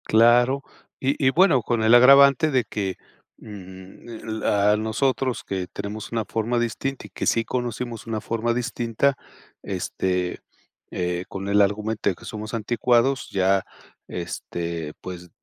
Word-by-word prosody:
Claro, 120 +4 +4 0.4
y 135 +2 +1
y - - +7
bueno, 160 -3 +4
con 115 +1 -1
el 110 +1 +5
agravante 140 +4 +7
de 130 -3 +2
que, 95 -3 -3 0.4
mm, 95 -3 -12 0.3
la 105 -1 +2
a 105 - +3
nosotros 125 +4 -1
que 95 -2 -4
tenemos 100 +2 -7
una 115 -2 -1
forma 115 +2 -1
distinta 130 +3 -3
y - - -21
que - - -4
sí 115 -1 +2
conocimos 120 -2 -4
una 110 -1 -2
forma 115 +2 -1
distinta, 120 +2 0 0.5
este, 90 -1 -2 0.5
eh, 90 0 -2
con 95 0 -6
el 100 +1 +4
argumento 105 +1 0
de 95 - -2
que - - -15
somos 110 +1 -7
anticuados, 120 +4 +1
ya, 95 0 +2 0.4
este, 85 -2 -5
pues, 90 -1 -8
110 Hz, 145 wpm, -24 LUFS, 100-125 Hz, 0.5 s, y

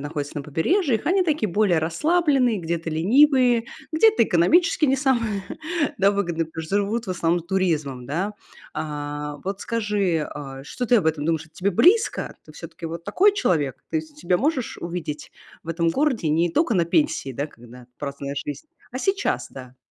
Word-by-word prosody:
находятся 145 0 -4
на - - -5
побережьях, 225 - +1
они 375 +2 +3
такие 300 - 0
более 190 -2 +3
расслабленные, 270 - +2
где-то 170 -1 -3
ленивые, 245 - +4 0.3
где-то 425 - +5
экономически 305 - +3
не 270 0 +3
самые, 235 -7 0 0.6
да, 195 0 +5
выгодные, 170 -5 -1
потому 160 0 -7
что 195 +6 -1
живут 215 +3 -1
в - - -3
основном 170 -1 +1
туризмом, 160 -8 -1
да. 180 +10 -2 0.4
А 150 -1 -4
вот 195 +1 -4
скажи, 205 -8 0
э, 135 -2 -7
что 245 - -4
ты 245 - +5
об 200 - +1
этом 155 -2 0
думаешь? 160 -1 0
Это 160 - -24
тебе 195 +2 0
близко? 365 - +3
Ты - - -13
всё-таки 165 - -9
вот 170 +1 -6
такой 405 - +4
человек? 150 - 0
Ты 320 - +1
с 315 -1 -15
себя 180 -11 +1
можешь 275 -4 -1
увидеть 170 -4 -5 0.3
в - - -15
этом 165 0 0
городе 260 - 0
не 165 +3 +2
только 250 - +1
на 170 -3 +2
пенсии, 235 - +1
да, 140 +4 -3
когда 120 -2 -15
праздная 140 -1 -5
жизнь, 145 - -5 0.2
а 255 - -5
сейчас, 390 +7 0
да? 130 -1 -11
180 Hz, 175 wpm, -23 LUFS, 155-255 Hz, 0.6 s, где-то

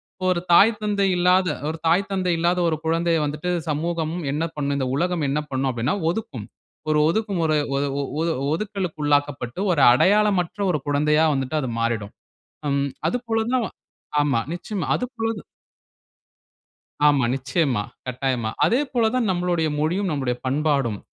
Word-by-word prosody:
இப்ப 185 - -5
ஒரு 175 - -3
தாய், 210 +4 +6
தந்தை 200 -2 +1
இல்லாத 180 +1 +3 0.2
ஒரு 160 - -4
தாய், 195 +4 +2
தந்தை 185 -2 0
இல்லாத 175 +2 +2
ஒரு 155 - -1
குழந்தைய 165 0 +2
வந்துட்டு 155 +5 -3 0.2
சமூகம் 160 +1 -1 0.2
என்ன 155 +2 -1
பண்ணும்? 140 -1 -1
இந்த 130 - -1
உலகம் 175 -3 0
என்ன 150 +2 0
பண்ணும்? 130 0 0
அப்டினா 125 +8 -1
ஒதுக்கும், 150 - -4 0.4
ஒரு 150 0 +3
ஒதுக்குமுறை 175 -7 0 0.2
ஒ - - +1 0.2
ஒ - - 0 0.2
ஒது 165 0 +1 0.2
ஒதுக்கலுக்கு 190 -4 -3
உள்ளாக்கப்பட்டு, 145 -1 0
ஒரு 145 -5 +2
அடையாளமற்ற 200 - +2
ஒரு 150 - 0
குழந்தையா 150 +2 +3
வந்துட்டு 135 +2 -2
அது 130 - -3
மாறிடும். 115 -3 -2 0.6
ம் 140 0 0 0.2
அது 245 - -1
போல 225 -1 +1
தான் 240 -3 +1 0.6
ஆமா 140 -5 +1
நிச்சயமா, 185 +1 -4
அது 250 - -2
போல 225 0 0
தா - - -15 1.6
ஆமா 140 -4 +4
நிச்சயமா, 135 -4 0 0.2
கட்டாயமா, 125 -3 -1
அதே 245 +5 +3
போல 230 -3 +2
தான் 240 -5 +1
நம்பளோடய 175 -3 0
மொழியும், 180 +5 0
நம்பளோட 130 -4 -1
பண்பாடும், 135 -6 0
160 Hz, 155 wpm, -23 LUFS, 140-185 Hz, 1.6 s, தாய்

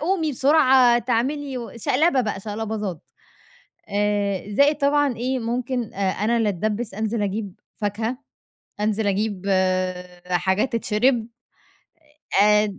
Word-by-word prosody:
قومي 320 -1 0
بسرعة، 265 -3 +5
تعملي 250 -1 -2
شقلبة 275 +4 +2
بقى 210 -4 -3
شقلباظات، 210 -4 -4 0.9
آآ 205 -1 -1
زائد 285 +3 +4
طبعًا 285 -2 +2
إيه 255 +2 -1
ممكن 245 0 -3
آآ 195 -1 0
أنا 220 +5 0
اللي 225 -2 +2
أتدبِّس 210 +3 -2
أنزِل 220 +1 -2
أجيب 200 -1 -4 0.2
فاكهة، 220 +4 -2 0.6
أنزِل 210 0 0
أجيب 200 -1 -1 0.9
حاجات 190 +8 +1
تتشرب 230 +1 +1 1.2
آآ 210 -1 +3
225 Hz, 110 wpm, -23 LUFS, 205-255 Hz, 1.2 s, بسرعة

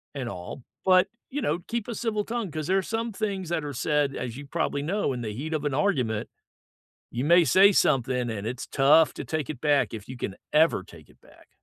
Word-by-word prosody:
and 130 -3 -4
all, 90 +8 -8 0.2
but, 185 -1 +5 0.2
you 290 - -3
know, 170 -4 0
keep 235 -1 -3
a 235 - -3
civil 215 -2 -1
tongue, 230 -5 -3
'cause 155 -1 -4
there 190 +1 +3
are - - 0
some 225 +3 -3
things 195 -5 -3
that 165 -3 -1
are 145 -1 -5
said, 145 -2 0
as 120 0 -5
you 145 0 -9
probably 145 -2 -1
know, 180 -4 0
in 120 - -5
the 110 -2 -4
heat 155 +5 -4
of 150 -1 -2
an 145 - 0
argument, 130 - 0 0.8
you 125 +3 -2
may 170 +2 +6
say 190 +9 +6
something, 125 -6 +2
and 105 -1 -4
it's 125 +1 -5
tough 150 +4 +4
to - - -6
take 155 -3 -3
it 140 -5 -6
back 145 -5 +2
if 105 0 -8
you 130 - -7
can 100 -5 -4 0.2
ever 155 - +4
take 80 -4 -15
it - - -24
back. - - -21
150 Hz, 230 wpm, -26 LUFS, 125-185 Hz, 0.8 s, may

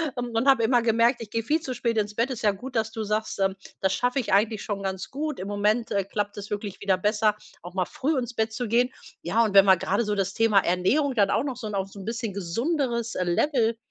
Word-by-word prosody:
und 240 0 -1
habe 265 -4 +5
immer 240 +1 +3
gemerkt, 235 +2 +2
ich 220 - -7
gehe 230 +1 -2
viel 310 +7 +1
zu 260 -5 -5
spät 230 -2 0
ins 210 0 -2
Bett. 235 +3 0
Ist 245 - -5
ja 215 - +3
gut, 245 +7 -5
dass 220 -1 0
du 220 -1 -4
sagst, 215 +1 -2
ähm, 195 0 +1 0.2
das 190 0 +1
schaffe 250 +5 0
ich 220 -7 -2
eigentlich 215 +1 +2
schon 200 -2 -4
ganz 190 -1 -4
gut. 300 -1 -3
Im 190 - -5
Moment, 210 +3 0
äh, 200 -1 +1
klappt 205 +1 -3
es 205 +1 -7
wirklich 205 -1 -5
wieder 195 -2 +2
besser, 210 +2 +2 0.3
auch 175 +2 -10
mal 185 -1 +1
früh 285 - -1
ins 245 -1 -3
Bett 220 -1 -1
zu 240 +1 -3
gehen. 245 +3 +2 0.3
Ja, 210 +7 +2
und 215 -3 -1
wenn 195 0 +8
man 190 -1 +6
gerade 200 +6 0
so 210 0 -1
das 195 0 -1
Thema 225 -1 +3
Ernährung 250 - +2
dann 200 -4 +3
auch - - +1
noch 270 -4 -4
so 225 -3 -6
'n 210 - -4
auf 195 0 -2
so 200 - -11
'n 190 - -8
bisschen 225 -2 -3
gesunderes 235 - -1
Level 230 - +1
220 Hz, 260 wpm, -26 LUFS, 200-240 Hz, 0.3 s, wenn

